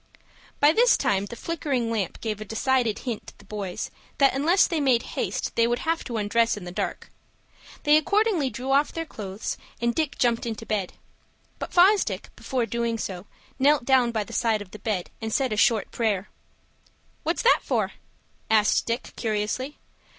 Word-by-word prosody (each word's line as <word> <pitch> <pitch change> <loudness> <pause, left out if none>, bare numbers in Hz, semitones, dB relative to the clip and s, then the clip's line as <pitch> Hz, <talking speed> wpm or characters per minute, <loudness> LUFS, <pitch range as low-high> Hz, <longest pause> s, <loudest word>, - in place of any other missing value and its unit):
By 290 +1 +6
this 480 +4 +5
time 195 0 +1
the 235 - -8
flickering 275 -6 -2
lamp 210 -6 -2
gave 215 -2 -3
a - - -5
decided 235 +1 +1
hint 235 -4 -4
to - - -12
the 210 - -18
boys 200 -3 -5 0.3
that 275 -1 +5
unless 320 +8 +4
they 330 -3 -1
made 255 -5 +3
haste - - -2
they 230 0 +4
would 240 0 +1
have 330 +1 0
to 235 -3 -3
undress 230 +2 +2
in 205 - -8
the 175 - -6
dark. - - -4 0.7
They 295 0 +6
accordingly 395 -3 +2
drew 250 +4 -4
off 280 +2 +3
their 330 0 -4
clothes, 205 -7 -5 0.2
and 235 0 +1
Dick 310 -1 -1
jumped 235 -1 +1
into 225 0 -5
bed. 205 -5 -2 0.7
But - - -5
Fosdick, 385 +3 +3
before 255 -3 -1
doing 235 0 -1
so, 190 -2 -5 0.3
knelt 275 -2 +4
down 255 -3 +4
by 220 -2 -1
the - - -11
side 220 -3 +1
of 185 - -21
the 215 - -10
bed, 200 -4 -2
and 220 0 -3
said 260 -1 +1
a - - -1
short 220 0 +2
prayer. 210 -4 -1 0.9
"What's 330 +3 -1
that 480 - +6
for?" - - 0 0.6
asked 215 -1 +3
Dick, 235 +2 -3
curiously. 225 +5 -2
235 Hz, 180 wpm, -25 LUFS, 215-280 Hz, 0.9 s, By